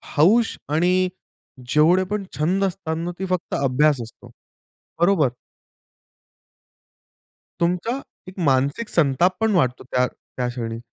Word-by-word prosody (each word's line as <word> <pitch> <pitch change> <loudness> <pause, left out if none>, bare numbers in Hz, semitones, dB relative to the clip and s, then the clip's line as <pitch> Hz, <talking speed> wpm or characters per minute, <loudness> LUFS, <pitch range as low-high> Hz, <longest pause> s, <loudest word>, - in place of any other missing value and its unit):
हौस 215 +10 +4
आणि 180 +4 +2 0.6
जेवढे 165 +7 +4
पण 210 -1 -2
छंद 180 +6 +1
असतात 180 -4 -3
ना, 170 +1 -3
ते 190 - -3
फक्त 180 -2 -2
अभ्यास 140 +1 +3
असतो, 115 0 -11 0.7
बरोबर? 175 -6 +4 2.3
तुमचा 180 +10 0 0.3
एक 185 +1 -10
मानसिक 140 - 0
संताप 170 +3 +2
पण 225 0 +2
वाढतो 130 -7 +1
त्या 125 0 +3
त्या 125 0 -6
क्षणी. 115 -2 -4
170 Hz, 115 wpm, -22 LUFS, 135-185 Hz, 2.3 s, हौस